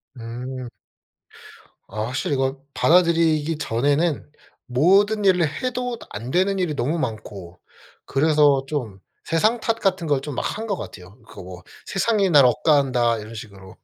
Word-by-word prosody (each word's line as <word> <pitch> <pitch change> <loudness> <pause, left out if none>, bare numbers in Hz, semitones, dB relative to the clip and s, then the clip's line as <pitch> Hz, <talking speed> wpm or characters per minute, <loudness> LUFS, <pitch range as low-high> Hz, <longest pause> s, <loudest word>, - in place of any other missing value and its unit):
음. 125 +2 -7 1.2
아 105 +2 -5
확실히 140 +5 -2
이걸 135 +1 -1 0.2
받아들이기 165 -2 +3
전에는 145 +5 0 0.4
모든 195 +11 +3
일을 180 -4 +4 0.2
해도 250 -1 -2
다 - - -13
안 120 +5 -7
되는 195 +2 +1
일이 175 -5 -1
너무 140 +6 -1
많고 100 - -6 0.5
그래서 145 -1 +3
좀 120 -10 -4 0.2
세상 215 +9 +1
탓 225 0 -1
같은 190 -4 0
걸 145 -2 +2
좀 145 -1 -6
막 - - -1 0.2
한 225 +1 -5
것 200 - -1
같아요. 95 - -10
그 - - -14
뭐 90 -1 -10 0.2
'세상이 200 0 +1
날 145 -5 +6
억까 150 +5 +3
한다.' 125 -4 +1
이런 110 +2 -10
식으로 100 -4 -11
145 Hz, 275 characters per minute, -22 LUFS, 120-180 Hz, 1.2 s, 날